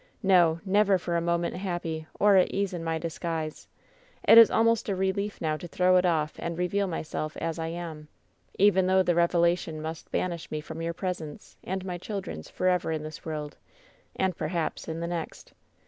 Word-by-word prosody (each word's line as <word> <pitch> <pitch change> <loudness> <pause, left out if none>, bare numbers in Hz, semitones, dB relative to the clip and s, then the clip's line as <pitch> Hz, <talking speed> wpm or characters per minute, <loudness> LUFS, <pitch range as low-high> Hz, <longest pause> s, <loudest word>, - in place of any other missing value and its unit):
No, 175 -4 +4
never 200 0 +4
for 175 -1 -3
a 170 - +1
moment 170 0 0
happy 175 -4 -4
or 205 -1 +5
at 185 - +5
ease 200 -1 -1
in 170 -2 -4
my 165 0 -1
disguise. 160 -1 -4 0.6
It 230 - +10
is 230 - +9
almost 230 -1 +2
a 195 - 0
relief 190 +2 -1
now 155 -2 -1
to 175 - -8
throw 185 +2 +3
it 180 0 +3
off 155 -3 0
and 170 -1 -4
reveal 195 +3 0
my 170 - -3
self 155 0 -5
as 165 0 -3
I 160 - -2
am, 165 -2 -6 0.5
even 190 -2 +4
though 190 0 +4
the 175 - +2
revelation 170 -1 +2
must 160 +1 -6
banish 170 -2 -2
me 155 - -3
from 160 +2 -7
your 165 0 -3
presence 170 -6 -5
and 190 0 -4
my 180 -2 -4
children's 185 - -6
forever 180 -2 0
in 155 -1 -2
this 155 0 -9
world, 150 -2 -5 0.6
and 190 -2 0
perhaps 160 -1 -3
in 165 0 -4
the 170 - -2
next. 170 -2 -6
170 Hz, 195 wpm, -27 LUFS, 160-185 Hz, 0.6 s, It